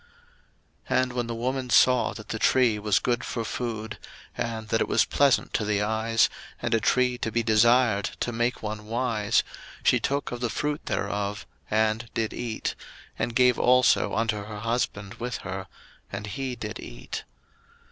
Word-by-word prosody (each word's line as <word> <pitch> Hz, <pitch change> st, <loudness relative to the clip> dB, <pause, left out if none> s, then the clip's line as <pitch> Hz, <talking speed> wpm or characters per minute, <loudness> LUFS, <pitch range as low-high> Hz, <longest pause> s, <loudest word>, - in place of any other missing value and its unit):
01:003:006 -, -, +4 dB
And 125 Hz, -1 st, -4 dB
when 120 Hz, -1 st, -2 dB
the 115 Hz, -, -3 dB
woman 130 Hz, +2 st, -2 dB
saw 125 Hz, 0 st, +5 dB
that 110 Hz, -, -10 dB
the 110 Hz, -, -3 dB
tree 120 Hz, -4 st, +3 dB
was 105 Hz, -1 st, +2 dB
good 120 Hz, 0 st, 0 dB
for 115 Hz, -2 st, -3 dB
food, 110 Hz, -4 st, -4 dB, 0.4 s
and 110 Hz, -2 st, -4 dB
that 115 Hz, -, +1 dB
it -, -, +1 dB
was -, -, +3 dB
pleasant 140 Hz, -2 st, +2 dB
to -, -, +1 dB
the 105 Hz, -1 st, +1 dB
eyes, 110 Hz, +1 st, +2 dB, 0.3 s
and 120 Hz, -, -1 dB
a 115 Hz, -, +4 dB
tree 125 Hz, +2 st, +2 dB
to 115 Hz, -, -2 dB
be 120 Hz, +1 st, +1 dB
desired 115 Hz, -1 st, +4 dB
to 120 Hz, -, -1 dB
make 120 Hz, +1 st, -1 dB
one 105 Hz, 0 st, -5 dB
wise, 115 Hz, -2 st, +1 dB, 0.4 s
she -, -, +4 dB
took 140 Hz, +1 st, -1 dB
of 120 Hz, -, -4 dB
the 120 Hz, -1 st, -1 dB
fruit 150 Hz, +5 st, -2 dB
thereof, 100 Hz, 0 st, -2 dB, 0.2 s
and 110 Hz, +2 st, +1 dB
did 110 Hz, -1 st, -1 dB
eat, 115 Hz, -3 st, -3 dB, 0.5 s
and 115 Hz, -, -1 dB
gave 125 Hz, -1 st, +4 dB
also 125 Hz, 0 st, +4 dB
unto 110 Hz, -2 st, 0 dB
her 105 Hz, -1 st, -7 dB
husband 110 Hz, -4 st, -2 dB
with 120 Hz, +1 st, -3 dB
her; 95 Hz, 0 st, -5 dB, 0.4 s
and 105 Hz, -, -5 dB
he 130 Hz, +4 st, -4 dB
did 110 Hz, -2 st, -6 dB
eat. -, -, -7 dB
115 Hz, 175 wpm, -26 LUFS, 105-125 Hz, 0.5 s, saw